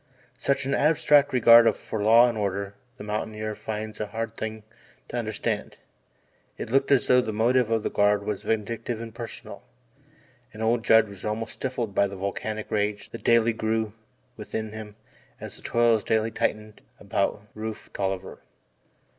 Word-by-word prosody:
Such 140 -1 0
an 135 - -1
abstract 150 -1 +4
regard 115 -2 +7
for 110 - -5
law 115 +3 +7
and 120 - -2
order 100 -1 -2 0.2
the - - -8
mountaineer 110 0 -3
finds 110 0 -6
a 105 - -2
hard 115 +1 -4
thing 110 -1 -5 0.5
to - - -6
understand. 110 -3 -3 0.8
It - - -6
looked 135 +1 +2
as 135 -3 +4
though 125 0 +5
the 110 - -3
motive 120 +2 +2
of 115 -1 +1
the - - -2
Guard 105 0 +2
was 105 -2 -3
vindictive 115 +1 -2
and 115 -1 -7
personal, 115 -2 -8 0.9
and 110 +1 -6
old 115 +1 +1
Judd 110 -1 +5
was 100 -1 -11
almost 110 +1 -3
stifled 120 -5 -3
by 100 - +3
the 100 - -8
volcanic 105 +3 -4
rage 105 0 -1
that 115 - -9
daily 115 -1 +4
grew 110 -1 -1 0.4
within 110 0 -5
him 110 -1 -8 0.4
as - - -8
the - - -14
toils 115 -2 +2
daily 110 0 +1
tightened 105 0 -2 0.2
about 100 0 -1
Rufe 110 0 -7
Tolliver. 95 -1 -3
110 Hz, 165 wpm, -26 LUFS, 105-115 Hz, 0.9 s, regard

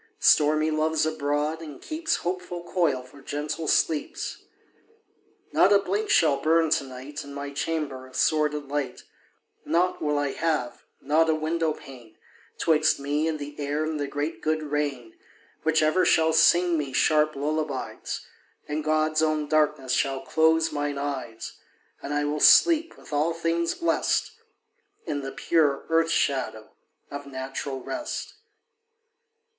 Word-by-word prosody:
Stormy 155 +1 +4
Love's 155 0 +1
abroad, 150 +1 -1
and 150 -4 -9
keeps 320 +1 -2
Hopeful 180 -1 -4
coil 165 -8 0
for 140 +2 -16
gentle 150 +3 -4
sleeps. 155 -2 0 1.1
Not - - +4
a 200 - +7
blink 200 +2 -2
shall 150 -4 +4
burn 160 +2 +2
to 165 -2 +2
night 135 +3 -8
In 140 0 -10
my 140 0 -5
chamber, 140 -3 -3
of 130 - -16
sordid 150 -2 +1
light; 145 -1 -3 0.6
Nought 180 +2 +1
will 150 -1 0
I 145 -1 0
have, 155 -7 -2 0.2
not 160 +2 +2
a 160 - +3
window 160 +1 0
pane, 120 -7 -14 0.4
'Twixt 155 -2 +2
me 145 +3 -1
and 160 -1 -1
the 145 0 -8
air 145 +1 -1
and 155 -1 -3
the 145 - -2
great 145 +3 -4
good 155 0 0
rain, 145 -6 -3 0.5
Which 160 0 +2
ever 155 +4 +3
shall 160 -2 +3
sing 175 -1 +4
me 140 -3 -4
sharp 155 +2 +3
lullabies; 145 -1 -3 0.4
And 150 +1 -3
God's 155 0 +1
own 155 -1 +1
darkness 150 -4 +1
shall 135 +1 0
close 160 0 +3
mine 145 -1 -2
eyes; 135 -5 -5 0.4
And 140 - -6
I 145 0 0
will 150 +1 -1
sleep, 330 - +5
with - - -12
all 155 +3 +1
things 165 0 0
blest, 335 +5 0 0.7
In 145 - -2
the 135 0 -5
pure 150 -4 +1
earth 165 0 +3
shadow 130 -8 -1 0.4
of 145 0 -7
natural 135 0 -5
rest. 305 -1 -5
150 Hz, 145 wpm, -26 LUFS, 140-160 Hz, 1.1 s, a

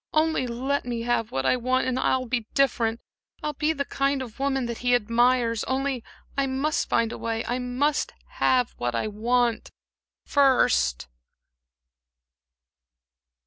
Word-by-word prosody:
Only 310 -4 +2
let 260 +4 -1
me 240 -1 -3
have 230 -2 0
what 135 0 -2
I - - +4
want, 255 +1 0
and 255 0 0
I'll 260 0 +1
be 235 -2 -2
different; 235 -4 +2 0.4
I'll 300 - -1
be 300 +3 0
the 280 -3 -2
kind 275 -1 0
of 240 0 -11
woman 270 -2 0
that 235 -1 -4
he 245 0 +3
admires; 235 0 +2
only 265 -2 -1 0.3
I 275 -1 +1
must 275 +5 -1
find 230 -1 +2
a - - -7
way, 225 0 -2
I 245 +3 -1
must 255 +4 0 0.3
have 250 -2 +3
what 120 0 -1
I 115 - 0
want 235 +2 0 0.6
first." 65 - +3
250 Hz, 145 wpm, -25 LUFS, 230-270 Hz, 0.6 s, I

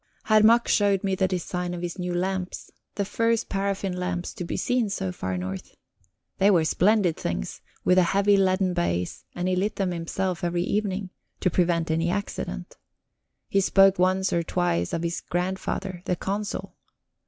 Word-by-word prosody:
Herr 215 -1 +5
Mack 230 +2 +5
showed 200 -2 +3
me 195 -1 0
the 190 0 +2
design 180 -1 -3
of 175 - -6
his 175 +2 -4
new 180 0 -2
lamps 185 0 -3 0.2
the 200 - -1
first 230 +2 0
paraffin 195 -1 -1
lamps 180 -1 -3
to - - -5
be 170 - -3
seen 245 -4 +1
so 95 - -2
far 95 +1 -3
north. 95 +1 -6 0.6
They 195 - +5
were 170 -5 +4
splendid 185 0 +3
things, 70 -8 -4 0.2
with 180 0 +5
a 175 -2 +3
heavy 200 +1 +4
leaden 185 -1 +2
base, 90 - -2
and 175 +1 -2
he 185 - +2
lit 205 +4 0
them 190 -2 0
himself 175 +1 -2
every 175 0 0
evening 195 -1 -1 0.3
to 185 - +2
prevent 170 -2 +1
any 165 +2 +1
accident. 200 +3 -4 0.7
He 195 - +2
spoke 195 0 +5
once 185 +1 +2
or 170 - +2
twice 165 - 0
of 165 - -2
his 170 0 -2
grandfather, 185 0 -3
the 180 - 0
Consul. 200 +3 -4
185 Hz, 175 wpm, -26 LUFS, 175-195 Hz, 0.7 s, Herr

